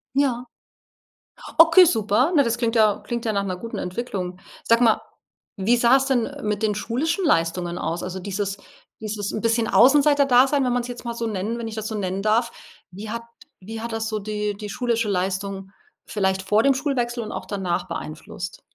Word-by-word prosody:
Ja. 255 -3 +1 1.1
Okay, 325 +3 +8
super. 230 - +2
Na, 290 - +6
das 235 0 -1
klingt 235 -1 0
ja 215 -2 +4
klingt 235 -1 -4
ja 220 - 0
nach 200 -1 0
'ner 185 -2 -3
guten 230 +5 -6
Entwicklung. 180 -2 -4 0.3
Sag 230 +1 +4
mal, 230 -3 +4 0.6
wie 215 +5 +2
sah 240 +2 +5
es 270 - 0
denn, 255 -4 +1
äh, 285 -1 -9
mit 210 0 -2
den 215 -1 +1
schulischen 305 - -1
Leistungen 175 - +1
aus? 165 0 -3
Also, 185 +1 -5
dieses 200 +1 -3 0.4
'n 215 -1 -3
bisschen 230 0 +1
Außenseiterdasein, 280 -1 +5
wenn 250 - +1
man's 245 0 -1
jetzt 245 0 -8
mal 235 -1 -4
so 230 0 -3
nennen 215 +2 -3
wenn 230 -1 -4
ich 220 - -7
das 220 0 -4
so 220 - -4
nennen 190 -1 -2
darf. 230 +3 +1 0.4
Wie 210 +4 -8
hat 230 +1 -4 0.4
wie 220 +4 -7
hat 235 +1 -5
das 225 0 -2
so 215 -1 -2
die 210 0 -3
die 210 0 -7
schulische 235 0 -1
Leistung 190 0 -2 0.4
vielleicht 190 -2 0
vor 210 +3 +2
dem 275 +1 +4
Schulwechsel 250 -4 -1
und 215 - -6
auch - - -6
danach 190 -4 -2
beeinflusst? 180 +4 -7
225 Hz, 190 wpm, -23 LUFS, 200-245 Hz, 1.1 s, Okay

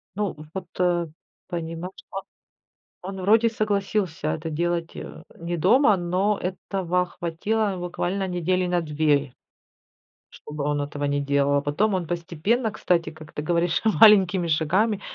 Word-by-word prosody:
Ну, 205 -2 -2 0.2
вот, 190 -2 -5
э, 175 -2 +2 0.4
понимаешь, 170 +1 -5 0.2
да? - - -5 0.9
Он 190 +1 -6
вроде 220 +5 +4
согласился 200 -6 -1
это 160 +1 -3
делать, 170 +1 -2
э, - - -8
не 170 +1 -4
дома, 210 - +4
но 185 +4 0
этого 180 -1 -1
хватило 195 +5 -2
буквально 180 +2 -2
недели 180 0 0
на 175 0 +1
2. 150 -3 +1 1.0
Чтобы 150 -1 -7
он 145 0 0
этого 145 0 -3
не 145 0 0
делал, 140 0 +1
а 140 - +2
потом 170 +10 +1
он 180 -3 -1
постепенно, 175 +8 -1
кстати, 175 -3 0
как 155 -1 -13
ты - - -4
говоришь, 170 +2 +1 0.2
маленькими 195 -5 +6
шагами 185 +7 +1
175 Hz, 140 wpm, -24 LUFS, 160-195 Hz, 1.0 s, маленькими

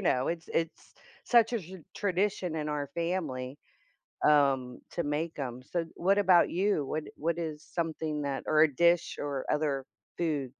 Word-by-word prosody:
know, 130 +1 +2
it's 165 -1 -3
it's 165 0 -2 0.3
such 235 -1 +5
a 235 - +1
tra 185 +2 -10 0.2
tradition 195 -3 0
in 150 -1 -2
our 145 -2 -2
family, 150 -7 -2 0.7
um, 135 -4 +3
to 170 - -2
make 150 +3 -2
'em, 125 -3 -4
so 170 +4 -2
what 195 +3 +2
about 185 -3 +5
you? 185 -5 +1
What 155 +3 -2
what 165 +2 -1
is 155 -3 -4
something 160 -2 -3
that 140 -1 -2
or 155 0 +4
a 150 -3 +2
dish 170 +3 +3
or 140 -2 -3
other 145 -3 0 0.3
food? 155 -6 0
155 Hz, 165 wpm, -30 LUFS, 145-175 Hz, 0.7 s, such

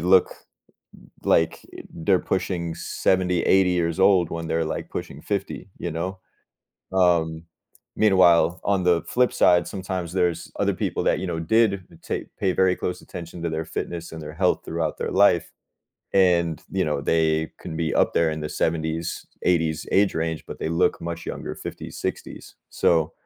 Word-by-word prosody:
look 90 +2 +4 0.9
like 80 - +3 0.3
they're 90 +3 +2
pushing 85 -3 -2
70, 90 0 +1
80 95 -1 +4
years 85 -1 0
old 95 -3 +4
when 85 0 -4
they're, 80 0 0
like, - - -4
pushing - - -6
50. - - -3
You 85 - -3
know? 90 +4 -4 0.7
Um. 85 -3 +2 0.5
Meanwhile, 90 -4 +4
on 100 -2 +1
the 85 -2 +3
flip 125 0 +2
side, 90 -1 +4
sometimes 95 -3 -4
there's 90 -3 0
other - - +2
people - - -2
that, - - +2
you 95 - -3
know, 85 -2 -2
did 100 +2 +2 0.2
ta - - 0 0.2
pay 95 - +2
very 95 0 +3
close 90 - -4
attention 85 0 -9
to 85 - 0
their 80 0 -3
fitness 85 -1 -5
and 80 - -7
their 75 0 -7
health 90 +3 +1
throughout 80 -1 -2
their - - -2
life, - - +4 0.6
and, 85 -4 +3
you 95 -1 +1
know, 75 -2 -1
they 80 +1 +1
can 80 - -6
be 80 -1 -1
up - - +3
there 85 -1 +3
in 80 - -5
the 75 - -3
70s, 80 +1 -2 0.2
80s 80 -3 +1
age 100 0 +3
range, 80 -1 -2
but - - -8
they - - -2
look 90 +2 +1
much 85 0 -5
younger, - - -5
50s, - - -8
60s. - - -6
So, 80 -2 +2
85 Hz, 170 wpm, -24 LUFS, 80-95 Hz, 0.9 s, look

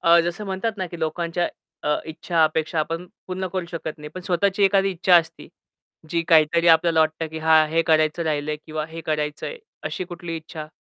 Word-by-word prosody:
अ, 170 0 +6
जसं 175 +5 -3
म्हणतात 195 +3 -2
ना, 185 - -2
की 170 -1 -9
लोकांच्या 170 +2 -1 0.4
अ, 150 - +2
इच्छा 165 +1 0
अपेक्षा 155 +1 -1
आपण 165 +3 -2 0.2
पूर्ण 185 0 -3
करू 185 -2 -2
शकत 160 -2 -5
नाही. 150 - -8
पण 185 - -5
स्वतःची 190 +2 +1
एखादी 195 0 +3
इच्छा 185 0 +3
असती, 165 -1 -1 0.6
जी 170 0 +1
काहीतरी 165 +1 +5
आपल्याला 165 0 +5
वाटतं 155 +1 +1
की 160 - -5
हां, 160 0 +5
हे 165 +1 +2
करायचं 155 +1 +3
राहिलंय 150 -1 -1
किंवा 155 -1 -3
हे 165 +1 -7
करायचंय 150 - -3 0.3
अशी 185 - -4
कुठली 175 -1 -6
इच्छा? 155 -1 -8
165 Hz, 190 wpm, -23 LUFS, 155-180 Hz, 0.6 s, अ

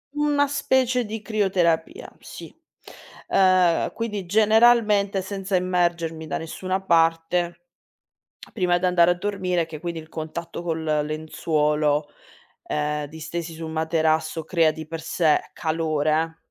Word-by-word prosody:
Una 290 -1 +2
specie 260 -3 +1
di 215 0 -6
crioterapia, 185 -7 0
sì. - - -11 0.8
Ehm, 185 -3 +3
quindi 210 -5 -4
generalmente 215 -1 +4
senza 195 0 -3
immergermi 170 -3 -1
da 140 - -2
nessuna 185 +4 -4
parte 170 0 +1 1.0
prima 180 -3 +2
d'andare 180 -1 +4
a - - +3
dormire 180 -3 -1
che 155 -2 -9
quindi 170 -1 -4
il 160 0 -13
contatto 165 +2 -6
col 160 -2 -3 0.2
lenzuolo, 150 -1 0 0.6
ehm, 150 0 -2
distesi 160 +2 -6
su 160 0 -7
un 160 - -6
materasso 160 0 0
crea 165 -1 +2
di 155 0 -8
per 165 0 -6
sé 160 -1 +2
calore 160 0 0
170 Hz, 120 wpm, -23 LUFS, 160-190 Hz, 1.0 s, generalmente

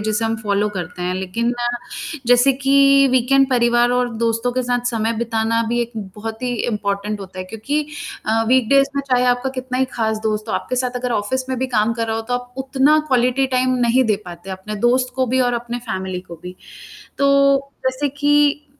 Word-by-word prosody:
जिसे 215 +1 -1
हम 225 0 0
फॉलो 205 0 +1
करते 180 0 -5
हैं। 180 +1 -1
लेकिन 190 +6 -2 0.7
जैसे 245 +3 +5
कि 275 +1 +4
वीकएंड 265 +2 +3
परिवार 240 -1 +3
और 250 0 +1
दोस्तों 230 +2 0
के 255 +1 -1
साथ 245 0 -1
समय 225 -1 0
बिताना 230 0 0
भी 240 +1 0
एक 235 0 -7 0.2
बहुत 220 +2 -7
ही 250 -1 -1 0.2
इंपोर्टेंट 205 -1 -2
होता 190 -1 -10
है, 185 - -4
क्योंकि 225 +10 -2 0.5
अ, 225 +1 +2
वीकडेज़ 260 +2 +4
में 280 - 0
चाहे 250 0 +3
आपका 245 +1 +1
कितना 255 0 -3
ही 265 - +3
खास 220 -2 -1
दोस्त 215 0 -2
हो, - - -2
आपके 255 - -3
साथ 250 0 -1
अगर 250 -1 -2
ऑफिस 255 +5 -2
में 260 -1 -2
भी 260 - -1
काम 215 +2 +2
कर 230 0 -2
रहा 220 0 -1
हो, 225 - -3
तो 245 +2 -3
आप 245 0 -5
उतना 275 +3 +3
क्वालिटी 255 +1 +2
टाइम 255 0 +2
नहीं 255 +3 +3
दे 215 -3 +2
पाते 175 +1 -9
अपने 190 +3 -6
दोस्त 250 +1 +1
को 260 -1 +1
भी 260 +2 +1
और 245 -1 +2
अपने 240 0 -4
फ़ैमिली 190 -3 -3
को 175 -2 -11
भी। 180 0 -9 0.6
तो 275 0 +3 0.2
जैसे 260 +2 0
कि 290 +1 +2
240 Hz, 205 wpm, -20 LUFS, 220-260 Hz, 0.7 s, जैसे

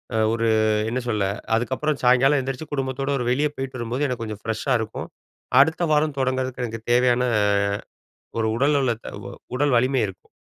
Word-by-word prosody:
அ - - +1 0.2
ஒரு 115 0 0 0.4
என்ன 125 +2 -1
சொல்ல? 105 -4 0 0.3
அதுக்கப்புறம் 130 +5 -1
சாயங்காலம் 135 +3 +5
எந்திரிச்சு 135 +4 -5
குடும்பத்தோட 135 0 -2
ஒரு 125 - -2
வெளியே 145 +3 +2
போய்ட்டு 135 -1 -5
வரும்போது 120 +5 -2
எனக்கு 125 -3 -3
கொஞ்சம் 105 -2 -6
ஃப்ரெஷ்ஷா 115 +4 -1
இருக்கும். 110 0 -5 0.5
அடுத்த 160 +4 +2
வாரம் 150 -1 +2
தொடங்கறதுக்கு 130 -1 -1
எனக்கு 115 -1 -6
தேவையான 125 0 +3 1.2
ஒரு 110 - +1
உடல்நலத்த 135 -4 0 0.4
உடல் 145 -2 +2
வலிமை 130 0 +2
இருக்கும். 95 - -13
130 Hz, 150 wpm, -23 LUFS, 115-135 Hz, 1.2 s, சாயங்காலம்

